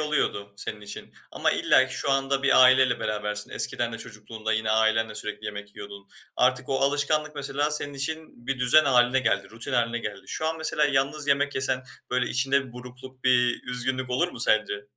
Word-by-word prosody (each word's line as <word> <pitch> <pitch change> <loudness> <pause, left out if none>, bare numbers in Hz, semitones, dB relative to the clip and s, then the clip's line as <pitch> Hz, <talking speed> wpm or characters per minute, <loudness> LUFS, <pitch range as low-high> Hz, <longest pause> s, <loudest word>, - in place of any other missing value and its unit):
oluyordu 135 -9 -1
senin 105 +1 -6
için 105 0 -9 0.2
ama - - +1
illaki - - +3
şu 140 - -2
anda 135 0 +1
bir 130 -1 +6
aileyle 130 -1 +5
berabersin. 105 0 -3
Eskiden 120 -1 -2
de 115 - -6
çocukluğunda 110 0 -6
yine 110 0 0
ailenle 110 0 +2
sürekli 105 0 -6
yemek 105 -1 -7
yiyordun. 100 -1 -10 0.3
Artık 130 +1 +2
o 135 - 0
alışkanlık 145 +2 +1
mesela 145 +1 -1
senin 145 -1 -2
için 140 -3 -5
bir 135 -1 -2
düzen 125 +5 +5
hâline 125 -1 +3
geldi, 100 -5 0
rutin 115 +1 -6
hâline 120 0 +1
geldi. 105 -3 -6
Şu 155 - -3
an 160 0 -2
mesela 150 -1 +1
yalnız 140 +1 0
yemek 140 +1 +2
yesen, 130 -1 0 0.3
böyle, 125 0 +1
içinde 135 +1 +1
bir 120 - -14
burukluk, 125 +1 -12
bir 125 -1 +3
üzgünlük 130 +1 -1
olur 170 +8 +1
mu 125 - -9
sence? 105 -2 +1
125 Hz, 185 wpm, -26 LUFS, 110-140 Hz, 0.3 s, bir